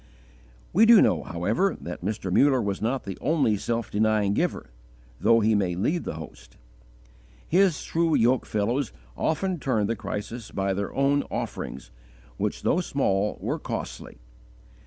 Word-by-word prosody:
We 220 +5 +6
do 230 -2 +9
know, - - +3
however, 105 - -1
that 85 - -7
Mr. 100 -2 -3
Muller 135 +2 +4
was 100 -4 -2
not 125 +5 -1
the 95 -2 -7
only 145 -9 +2
self 115 +2 -3
denying 105 -1 +2
giver, - - -2 0.5
though 115 0 +4
he 110 +1 +3
may 95 -4 +1
lead 150 - -1
the - - -4
host. 80 -6 -11 0.9
His 180 -2 +3
true 165 -1 +1
yoke 125 +3 +2
fellows 115 +5 -1 0.2
often 180 +2 -1
turned 115 -7 0
the 115 - -1
crisis 110 +2 -6
by 95 0 -1
their 100 +1 -3
own 140 +1 +3
offerings, - - -5 0.5
which - - -2
though 180 - +2
small 105 - 0
were - - -2
costly! - - -6
115 Hz, 150 wpm, -26 LUFS, 100-145 Hz, 0.9 s, do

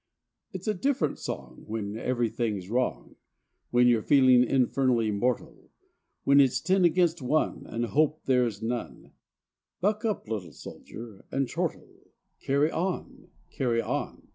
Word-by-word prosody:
It's 190 +2 -7
a 215 - +2
different 195 - 0
song - - -7
when 105 -1 -4
everything's 115 -5 -2
wrong, 125 +1 -2 0.5
When 125 0 +4
you're 120 -2 +4
feeling 130 -1 +5
infernally 125 -3 +2
mortal; 120 +3 -2 0.5
When 140 +1 +5
it's 135 -2 +4
ten 185 +1 +2
against 170 -1 +2
one, 150 +5 0
and 115 +1 -2
hope 150 +5 +1
there 125 -2 +3
is 110 -1 -6
none, 120 +1 -4 0.7
Buck 210 +3 0
up, 215 - -2
little 100 -8 -5
soldier, 110 - -11
and 135 -1 0
chortle: - - -4 0.4
Carry 140 +3 +1
on! 180 +2 -4 0.2
Carry 120 -3 0
on! - - -3
125 Hz, 135 wpm, -28 LUFS, 115-155 Hz, 0.7 s, feeling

